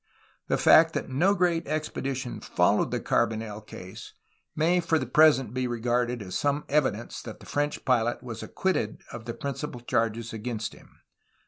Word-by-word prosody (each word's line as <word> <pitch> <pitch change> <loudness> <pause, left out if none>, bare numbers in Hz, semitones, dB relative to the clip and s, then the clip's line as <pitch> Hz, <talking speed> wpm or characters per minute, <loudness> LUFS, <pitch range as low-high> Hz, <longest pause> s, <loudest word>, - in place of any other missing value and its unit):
The - - +1
fact 160 0 +6
that - - -2
no 175 +10 +3
great 170 -3 +1
expedi 150 -3 -2
tion 125 -1 -5
followed - - +2
the - - -1
Carbonel 110 -2 -1
case 95 -3 -10 0.4
may 170 +4 +3
for 165 -1 +1
the 130 - -2
present 135 -3 +4
be 130 0 -1
re 120 -1 -3
garded 120 0 0
as 95 -2 -8
some 145 +1 0
evidence 130 -7 0
that - - -9
the - - -14
French 145 0 -2
pilot 120 -1 +1
was 120 -3 -6
ac - - -9
quitted 185 - -1
of 120 -2 -8
the 115 - -5
principal 140 -2 -5
charge 115 -1 -1
against 110 -1 -4
him. - - -19
125 Hz, 180 wpm, -27 LUFS, 115-150 Hz, 0.4 s, fact